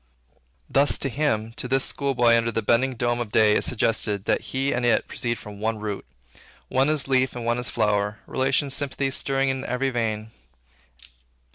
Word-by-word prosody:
Thus 140 +1 +3
to 135 - -2
him, 115 -5 -1
to - - -3
this 135 +1 +2
school 140 -1 -1
boy 120 -1 +5
under 115 0 +1
the 115 0 -2
bending 125 +4 +2
dome 120 0 0
of 115 -4 -4
day, 105 -1 +4
is - - +1
suggested, 110 -4 0
that - - +1
he 135 +1 0
and 120 - -1
it 120 -2 +2
proceed 120 -1 -3
from 105 -1 -10
one 110 +1 -1
root; 105 -7 -5 0.6
one 135 +3 +2
is 155 -3 +1
leaf 130 -1 +1
and 120 -1 -5
one 120 +1 +1
is 125 - -2
flower; 105 -2 0
relation, 135 +1 0
sympathy, 135 -1 0
stirring 135 0 0
in 130 0 -2
every 135 +1 -1
vein. 110 -2 -2
120 Hz, 185 wpm, -24 LUFS, 110-135 Hz, 0.6 s, boy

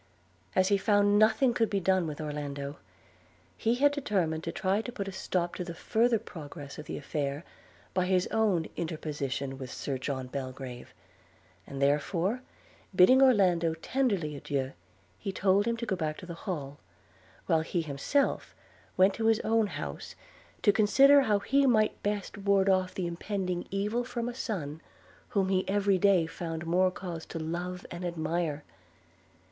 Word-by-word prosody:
As 185 0 +3
he 200 -1 +3
found 205 0 +4
nothing 220 +4 +4
could 230 -2 +1
be 200 - 0
done 185 -2 +2
with 150 -2 -6
Orlando, 145 -2 -4 0.8
he 230 +2 +1
had 285 +3 +4
determined 185 - -1
to - - -2
try 195 +3 0
to 245 - -6
put 200 -4 -5
a - - -4
stop 180 -2 -2
to 180 - -4
the 170 -1 -7
further 230 +6 +2
progress 145 -9 -9
of 150 - -9
the - - -4
affair, 145 +1 -3 0.5
by 180 -1 +1
his 185 -1 +2
own 205 -7 +2
interposition 140 -5 -3
with 130 -2 -6
Sir 135 -2 -4
John 130 -1 -3
Belgrave; 130 -1 -7 0.8
and 135 - -7
therefore, 165 - +1 0.5
bidding 255 +10 +7
Orlando 180 -10 +4
tenderly 195 - -1
adieu, 135 -2 -2 0.5
he 195 - -3
told 195 +2 +2
him 235 0 0
to 235 - -4
go 195 - 0
back 155 -3 -2
to - - -9
the 175 - -6
Hall, 150 -6 -5 0.7
while 160 -1 +3
he 165 +1 -2
himself 155 - -1 0.4
went 190 +1 +5
to 225 +2 -1
his 225 -1 +4
own 225 -1 +2
house 75 - -6 0.5
to 205 - +6
consider 275 +7 +6
how 215 -6 +2
he 275 +7 +2
might 215 -4 +2
best 205 0 -3
ward 200 -1 +3
off 185 -1 +1
the 185 - -2
impending 180 +1 -3
evil 210 +5 -1
from 240 -1 -4
a 245 - -3
son 165 - -4 0.5
whom 195 -2 +1
he 190 -1 +2
every 200 -1 +2
day 190 -3 +4
found 165 0 -5
more 180 +3 +3
cause 175 -3 -6
to - - -6
love 175 +3 -4
and 175 +1 -6
admire. 165 -3 -2
185 Hz, 165 wpm, -29 LUFS, 155-205 Hz, 0.8 s, bidding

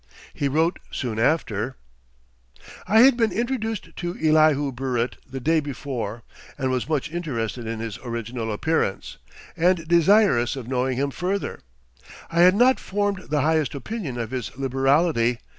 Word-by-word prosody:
He 140 - -1
wrote 160 +5 +1
soon 115 -4 -3
after: 120 -3 0 1.1
"I 220 +2 +6
had 265 0 +7
been 225 -3 +1
introduced 225 0 -3
to 175 0 -4
Elihu 155 -3 +3
Burritt 125 -1 -2
the 135 +1 -5
day 160 +5 +2
before, 125 -6 -5 0.3
and 130 -2 -1
was 130 +3 -2
much 155 0 -1
interested 125 -9 -3
in 115 0 -4
his 110 -2 -5
original 115 -1 -4
appearance, 130 -2 -1 0.4
and 170 -1 +2
desirous 170 - +4
of 130 -4 -7
knowing 130 0 -1
him 140 +1 0
further. 185 +9 -3 0.7
I 170 - 0
had 180 +2 +7
not 250 +4 +4
formed 200 -1 -2
the 150 -1 +1
highest 155 -2 +1
opinion 145 - -5
of 115 -1 -4
his 125 -5 -3
liberality. 135 -1 +2
140 Hz, 145 wpm, -24 LUFS, 120-175 Hz, 1.1 s, had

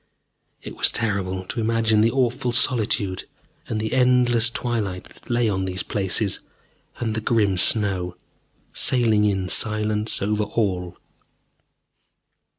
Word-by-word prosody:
It - - -8
was - - +3
terrible 95 -4 -2
to 120 - -5
imagine 110 -1 +2
the 115 - +4
awful 125 0 0
solitude 110 -6 +1 0.4
and 110 - -3
the 110 0 -3
endless 125 -2 +3
twilight 110 -7 -3
that - - -16
lay 120 -1 +1
on 95 -2 -1
these 95 0 -3
places, 100 +1 -1 0.6
and 115 -3 -2
the 110 - -2
grim 105 -4 +1
snow, 90 -2 +2 0.6
sailing 110 -4 +3
in 95 -3 0
silence 110 +1 0
over 105 +1 -1
all.... 95 -5 -2
110 Hz, 125 wpm, -22 LUFS, 95-115 Hz, 0.6 s, the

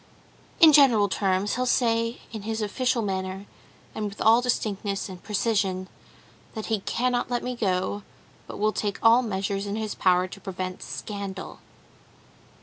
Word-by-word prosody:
"In 320 -4 +8
general 250 -8 +6
terms, 195 +1 0
he'll 255 0 0
say 230 -1 +1
in 220 -2 -6
his 220 +1 -3
official 245 +3 0
manner, 190 0 -3 0.5
and 215 - -3
with 205 0 -6
all 225 +2 +5
distinctness 205 -5 -2
and 185 -2 -9
precision, 200 -3 0 0.7
that 220 - -4
he 215 - +1
cannot 245 +5 -1
let 245 -1 -1
me 250 0 -3
go, 190 -2 -1 0.5
but - - -8
will 215 +1 +1
take 205 -2 -2
all 230 +2 +7
measures 200 -2 -2
in 200 - -3
his 215 -1 -3
power 185 0 +2
to 195 +2 -11
prevent 185 -1 -5
scandal. 200 -2 -6
210 Hz, 150 wpm, -26 LUFS, 195-230 Hz, 0.7 s, In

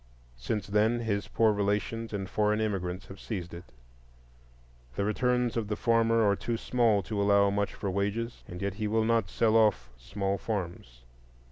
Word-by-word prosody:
Since 100 - -2
then 110 +3 +2
his 100 -3 -2
poor 110 -2 +3
relations 105 +3 -1
and 100 -2 -3
foreign 105 +2 +1
immigrants 95 -4 -2
have 95 - -11
seized 90 -6 -5
it. 85 +1 -9 1.3
The 100 - 0
returns 125 +2 +1
of 115 -3 -1
the 105 - -2
farmer 115 0 +3
are 100 - +3
too 115 +3 -3
small 115 -4 +2
to 100 +4 -2
allow 100 0 +4
much 100 0 -1
for 100 - -3
wages, 105 +5 -2
and 90 +2 -7
yet 100 -1 -1
he 105 +1 -3
will 110 +1 +1
not 115 -4 +1
sell 110 -1 +2
off 105 - +3
small 100 +8 -2
farms. 85 - -5
105 Hz, 170 wpm, -29 LUFS, 100-115 Hz, 1.3 s, allow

